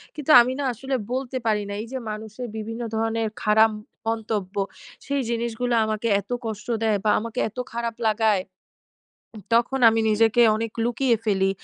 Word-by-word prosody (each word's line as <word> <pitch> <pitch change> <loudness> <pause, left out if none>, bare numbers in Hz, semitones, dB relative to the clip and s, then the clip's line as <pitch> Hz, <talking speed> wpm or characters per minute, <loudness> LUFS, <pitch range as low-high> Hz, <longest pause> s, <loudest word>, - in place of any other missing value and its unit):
কিন্তু 300 0 -1
আমি 245 +2 0
না - - -1
আসলে 265 +4 -3 0.2
বলতে 260 0 -2
পারি 210 -2 +1
না। - - -4
এইযে 260 +3 -6
মানুষের 220 +3 -7
বিভিন্ন 225 +2 -5
ধরনের 225 0 0
খারাপ 220 +1 +5 0.4
মন্তব্য, 215 -3 -2 0.5
সেই 280 -1 0
জিনিসগুলো 235 +1 -1
আমাকে 215 +1 -2
এতো 205 +5 -4
কষ্ট 215 -2 -5 0.2
দেয় 215 -2 +2
বা 215 - +2
আমাকে 225 +1 -5
এতো 250 +4 -5
খারাপ 235 0 -3
লাগায়। 215 -3 +2 0.9
উ 210 - -8
তখন 245 +3 +2
আমি 225 0 +2
নিজেকে 225 +2 +4
অনেক 225 0 -3
লুকিয়ে 240 0 +2
ফেলি। 195 -2 +2
225 Hz, 160 wpm, -24 LUFS, 215-240 Hz, 0.9 s, খারাপ